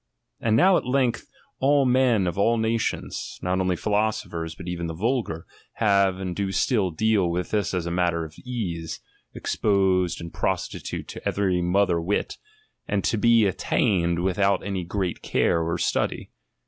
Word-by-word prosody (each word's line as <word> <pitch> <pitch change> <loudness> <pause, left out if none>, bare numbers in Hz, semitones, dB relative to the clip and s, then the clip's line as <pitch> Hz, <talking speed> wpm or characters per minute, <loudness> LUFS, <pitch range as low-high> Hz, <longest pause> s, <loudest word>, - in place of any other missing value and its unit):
Aiul 110 -1 +2
now 185 +9 +5
at - - -3
length 125 -2 0 0.3
all 140 +1 +3
men 125 -5 +3
of 85 -2 -1
all 115 +4 +2
nations, 110 0 -2
not 90 +1 0
only 90 -1 +1
philosophers 100 -5 -1
but 90 - -10
even 85 -1 -3
the 80 - -5
vulgar, 110 -5 -1 0.3
have 100 -3 +2
and 95 -2 -4
do 100 -1 -2
still 105 -2 +1
deal 100 +1 +1
with 90 +1 -2
this 105 -2 0
as 90 -2 -2
a 85 - -3
matter 85 -2 0
of 80 - -11
ease, 90 -10 -4 0.4
exposed 95 -3 +1
and 85 -1 -8
prostitute - - -3
to - - -8
every 95 -3 0
mother 90 -1 +2
wit, 95 +5 -2 0.5
and 100 -2 0
to - - +1
be 115 0 +4
at 95 - -1
tained 85 -3 +1
without 95 +1 +1
any 95 -3 -2
great 90 0 -3
care 85 - +1
or 85 +1 -1
study. - - -1
95 Hz, 165 wpm, -25 LUFS, 85-110 Hz, 0.5 s, now